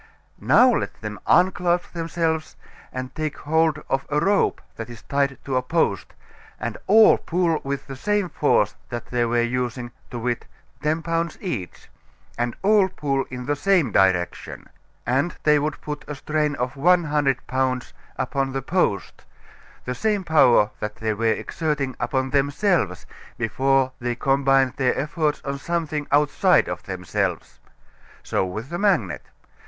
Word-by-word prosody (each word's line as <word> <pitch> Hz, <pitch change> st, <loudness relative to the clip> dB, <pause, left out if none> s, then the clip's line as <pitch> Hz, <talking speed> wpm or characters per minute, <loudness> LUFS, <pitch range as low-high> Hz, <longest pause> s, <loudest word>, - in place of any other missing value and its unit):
Now 255 Hz, 0 st, +5 dB
let -, -, -3 dB
them 105 Hz, -1 st, -6 dB
unclasp 180 Hz, -1 st, +2 dB
themselves 165 Hz, -1 st, -2 dB, 0.4 s
and 130 Hz, 0 st, -6 dB
take 155 Hz, -1 st, -3 dB
hold 160 Hz, 0 st, +1 dB
of 135 Hz, 0 st, 0 dB
a 150 Hz, 0 st, +1 dB
rope 200 Hz, +5 st, +2 dB, 0.2 s
that 115 Hz, +1 st, -7 dB
is 120 Hz, -2 st, -11 dB
tied 140 Hz, -1 st, 0 dB
to 135 Hz, -, -2 dB
a -, -, +2 dB
post, 125 Hz, -, -1 dB, 0.4 s
and 110 Hz, 0 st, -3 dB
all 215 Hz, +2 st, +7 dB
pull 170 Hz, -2 st, 0 dB
with 140 Hz, 0 st, -3 dB
the 135 Hz, -, -7 dB
same 205 Hz, +6 st, 0 dB
force 125 Hz, -, +2 dB, 0.2 s
that 120 Hz, -1 st, -6 dB
they 120 Hz, -1 st, +1 dB
were 120 Hz, 0 st, +1 dB
using, 120 Hz, 0 st, -2 dB, 0.2 s
to 120 Hz, -, -6 dB
wit, 120 Hz, 0 st, -2 dB, 0.3 s
ten 155 Hz, +2 st, 0 dB
pounds 165 Hz, 0 st, -1 dB
each, 115 Hz, -, -5 dB, 0.5 s
and 120 Hz, 0 st, -2 dB
all 200 Hz, -1 st, +4 dB
pull 140 Hz, -6 st, -1 dB
in 125 Hz, -1 st, -6 dB
the 145 Hz, +2 st, 0 dB
same 170 Hz, -, +2 dB
direction, 95 Hz, -2 st, 0 dB, 0.4 s
and 135 Hz, +8 st, 0 dB
they 150 Hz, -1 st, +4 dB
would 150 Hz, +1 st, -2 dB
put 150 Hz, -1 st, -5 dB
a 150 Hz, -, -5 dB
strain 150 Hz, +1 st, -1 dB
of 125 Hz, 0 st, -3 dB
one 175 Hz, +5 st, +4 dB
hundred 145 Hz, -5 st, 0 dB
pounds 130 Hz, -1 st, -1 dB, 0.2 s
upon 135 Hz, 0 st, -1 dB
the 135 Hz, -1 st, -3 dB
post, 150 Hz, -, -1 dB, 0.6 s
the 125 Hz, -, -2 dB
same 210 Hz, +5 st, 0 dB
power 135 Hz, -, +4 dB
that 105 Hz, 0 st, -4 dB
they 110 Hz, 0 st, -1 dB
were 115 Hz, +2 st, -3 dB
exerting 140 Hz, +3 st, -1 dB
upon 130 Hz, -2 st, -1 dB
themselves 140 Hz, -, +1 dB, 0.3 s
before 130 Hz, +3 st, +1 dB
they 120 Hz, -1 st, -2 dB
combined 135 Hz, 0 st, +2 dB
their 130 Hz, -3 st, +1 dB
efforts 150 Hz, +1 st, -1 dB
on 140 Hz, 0 st, -3 dB
something 155 Hz, -2 st, -2 dB
outside 145 Hz, +1 st, +3 dB
of -, -, -4 dB
themselves. 95 Hz, -1 st, -3 dB, 0.6 s
So -, -, 0 dB
with 110 Hz, +7 st, -5 dB
the 175 Hz, +1 st, -4 dB
magnet. 155 Hz, -, +1 dB
140 Hz, 155 wpm, -23 LUFS, 120-160 Hz, 0.6 s, all